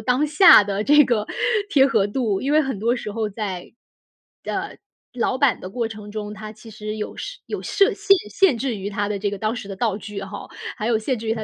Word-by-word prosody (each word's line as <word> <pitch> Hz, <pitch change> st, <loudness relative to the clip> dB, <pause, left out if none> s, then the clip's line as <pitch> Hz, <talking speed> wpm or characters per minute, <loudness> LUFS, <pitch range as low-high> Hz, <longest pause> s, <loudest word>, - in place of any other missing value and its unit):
当 255 Hz, +3 st, +1 dB
下 310 Hz, -, +8 dB
的 200 Hz, +1 st, -2 dB
这 295 Hz, +3 st, +6 dB
个 225 Hz, -4 st, 0 dB, 0.4 s
贴 275 Hz, -8 st, +5 dB
合 215 Hz, -6 st, +2 dB
度。 210 Hz, -3 st, -1 dB
因 280 Hz, -, -1 dB
为 310 Hz, +1 st, +5 dB
很 265 Hz, -8 st, -3 dB
多 235 Hz, +3 st, +1 dB
时 225 Hz, -4 st, -5 dB
候 220 Hz, 0 st, -2 dB
在 195 Hz, -4 st, -6 dB, 1.4 s
呃， 250 Hz, -, -12 dB
老 245 Hz, -, +1 dB
版 280 Hz, -3 st, +3 dB
的 -, -, -7 dB
过 235 Hz, +1 st, -2 dB
程 210 Hz, -2 st, -10 dB
中， 210 Hz, -1 st, -5 dB
它 215 Hz, 0 st, -8 dB
其 220 Hz, +1 st, -14 dB
实 215 Hz, 0 st, -6 dB
有 215 Hz, -, -6 dB
设 -, -, -7 dB
有 -, -, -5 dB
设 395 Hz, -, +3 dB
限 395 Hz, -1 st, +4 dB
限 345 Hz, -, +3 dB
制 245 Hz, 0 st, -2 dB
于 200 Hz, +1 st, -5 dB
它 205 Hz, 0 st, -1 dB
的 210 Hz, -, -2 dB
这 200 Hz, 0 st, -2 dB
个 205 Hz, -, -5 dB
当 215 Hz, +3 st, -1 dB
时 220 Hz, -, -7 dB
的 195 Hz, -, -6 dB
道 205 Hz, -1 st, -1 dB
具 205 Hz, -1 st, -7 dB
哈， 195 Hz, +1 st, -8 dB, 0.3 s
还 210 Hz, -, -4 dB
有 225 Hz, -1 st, +2 dB
限 250 Hz, +3 st, -1 dB
制 225 Hz, 0 st, -7 dB
于 220 Hz, -, +2 dB
它 220 Hz, -1 st, -5 dB
220 Hz, 255 characters per minute, -22 LUFS, 205-255 Hz, 1.4 s, 下